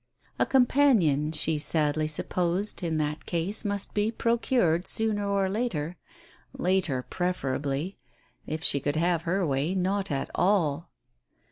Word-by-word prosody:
A - - +2
companion, 235 - +3
she 155 0 0
sadly 155 0 0
supposed, 180 +6 -1
in 165 -3 -1
that 150 0 -3
case 175 +5 -2
must 200 -2 -2
be 210 +1 +1
procured 230 -7 +1
sooner 210 -2 +2
or 200 -1 +1
later 190 -7 -2 0.3
— - - -25 0.2
later, 175 -8 0
preferably; 145 -1 -2 0.5
if 155 +1 -4
she 140 - +5
could 145 +2 -2
have 170 +1 +1
her 190 +1 +1
way, 145 +5 -1
not 195 +2 -1
at 140 -3 -3
all 170 -5 +1
175 Hz, 135 wpm, -27 LUFS, 155-200 Hz, 0.5 s, she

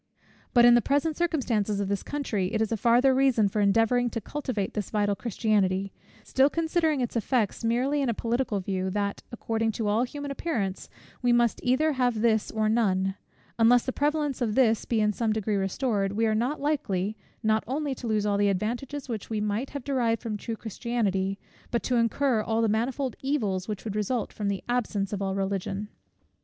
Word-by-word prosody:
But 240 0 +7
in 240 - +8
the 240 - +5
present 285 +6 +1
circumstances 235 - 0
of 200 - -1
this 200 -1 -1
country, 215 -10 -2
it 220 - +1
is 220 0 0
a - - +2
farther 245 +4 +4
reason 260 -5 +3
for 210 +2 -1
endeavouring 225 +4 +3
to 230 - -3
cultivate 230 -4 -3
this 210 -3 -3
vital 205 -1 +1
Christianity, 195 -4 0 0.3
still 270 +2 +3
considering 320 -2 +1
its 245 - -3
effects 230 -1 0
merely 255 +6 +1
in 270 - 0
a 230 - 0
political 235 -2 -1
view, 190 0 -2
that, 200 +1 -2
according 225 -1 -1
to 220 0 -2
all 210 +3 +2
human 285 +3 -4
appearance, 220 - -3 0.3
we 245 -1 +3
must 240 -1 +3
either 275 +6 +2
have 245 -4 +1
this 220 -2 +2
or 220 -1 0
none: 195 -4 +1 0.5
unless 235 +1 +5
the 260 - -2
prevalence 295 -2 0
of 220 -3 0
this 230 -4 +3
be 225 -2 +1
in 210 0 +2
some 220 0 0
degree 215 -1 -1
restored, 195 0 0
we 225 +2 +1
are 220 - +2
likely, 230 -5 -1 0.3
not 220 0 +2
only 285 +2 -1
to 250 -2 -7
lose 215 -2 +1
all 200 -1 +1
the 205 0 +3
advantages 245 +9 -3
which 225 -5 -5
we 220 -1 -1
might 210 +5 -1
have 280 -3 -6
derived 240 -5 +1
from 225 -3 -3
true 225 +2 -4
Christianity, 205 -4 -2 0.3
but 235 - -1
to 250 - +1
incur 235 +1 +2
all 225 +1 0
the - - +3
manifold 245 +4 -1
evils 210 -10 -1
which 210 -3 -4
would 210 -2 -4
result 215 +2 -1
from 210 - -3
the 200 -1 -2
absence 215 -5 -1
of 200 - -3
all 195 -1 -1
religion. 195 +1 -2
225 Hz, 195 wpm, -27 LUFS, 205-255 Hz, 0.5 s, in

